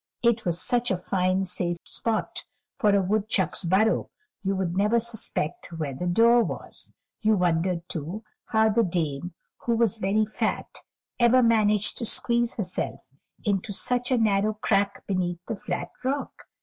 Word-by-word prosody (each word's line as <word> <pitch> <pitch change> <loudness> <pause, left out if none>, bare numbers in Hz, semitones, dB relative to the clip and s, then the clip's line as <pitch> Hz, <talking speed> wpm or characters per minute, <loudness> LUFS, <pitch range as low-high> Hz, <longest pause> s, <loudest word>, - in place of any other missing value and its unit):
It 235 -1 +2
was 175 -1 +1
such 245 +3 +3
a 190 - +1
fine, 185 +1 0
safe 175 -2 -1
spot 225 -2 -2 0.3
for 205 -1 +2
a 195 - +2
woodchuck's 200 -2 +1
burrow; 195 +6 +2 0.3
you 195 -1 -1
would 185 -2 -2
never 210 +4 +2
suspect 220 -7 0
where 155 -4 -4
the 175 +7 -4
door 230 +6 +5
was. - - -5 0.3
You 215 -1 +2
wondered 175 0 0
too 170 +7 -5 0.3
how 220 0 +3
the 225 +2 +2
Dame, 170 -3 -2 0.2
who 235 - -1
was 230 -2 +1
very 210 +1 +1
fat, 220 +2 -3 0.4
ever 245 +1 +5
managed 210 -3 +3
to 235 - 0
squeeze 235 +1 +3
herself 180 - -3 0.3
into 200 0 0
such 245 +4 +2
a 255 - +2
narrow 215 -1 +1
crack 200 -2 0
beneath 180 -3 -1
the 225 - -4
flat 180 -2 -4
rock. 275 +2 -3
205 Hz, 155 wpm, -25 LUFS, 180-230 Hz, 0.4 s, door